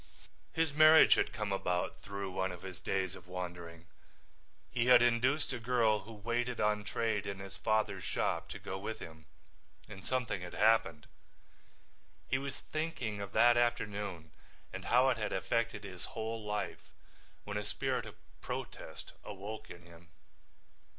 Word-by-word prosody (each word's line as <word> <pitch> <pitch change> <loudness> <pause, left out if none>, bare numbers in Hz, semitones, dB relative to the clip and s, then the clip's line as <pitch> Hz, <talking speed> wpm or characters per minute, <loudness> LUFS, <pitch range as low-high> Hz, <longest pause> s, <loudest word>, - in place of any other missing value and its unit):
His 160 -3 +1
marriage 155 +1 +8
had - - +1
come 105 -2 -3
about 90 -2 -1
through 100 -1 -5
one 95 0 -1
of 90 0 -9
his 95 -2 -7
days 95 -2 -1
of 90 -1 -13
wandering. 85 -2 -6 0.9
He 120 0 +1
had 125 -1 +8
induced 125 +5 +2
a - - -3
girl 115 -3 +3
who 115 - -10
waited 120 +3 -2
on 105 0 +2
trade 105 -2 -1
in 100 -1 -3
his 95 -3 -9
father's 110 0 0
shop - - -1
to - - -5
go 95 - -5
with 110 +3 -4
him 80 -5 -11 0.6
and 95 -3 -10
something 125 -7 -1
had 90 - -7
happened. 105 -8 +3 1.2
He 130 - +1
was 140 0 -6
thinking 140 -10 -3
of 100 -1 -5
that 120 0 +6
afternoon 105 -8 -1 0.4
and - - -6
how 125 +2 +5
it 125 - +1
had 105 -2 -2
affected 115 +2 0
his 90 -3 -8
whole 110 0 -3
life 105 -1 -3 0.5
when 105 0 -4
a 105 - -2
spirit 125 +2 -2
of 110 - -10 0.3
protest - - -6
awoke 105 +2 -7
in 85 0 -11
him. 85 0 -15
105 Hz, 155 wpm, -34 LUFS, 95-120 Hz, 1.2 s, marriage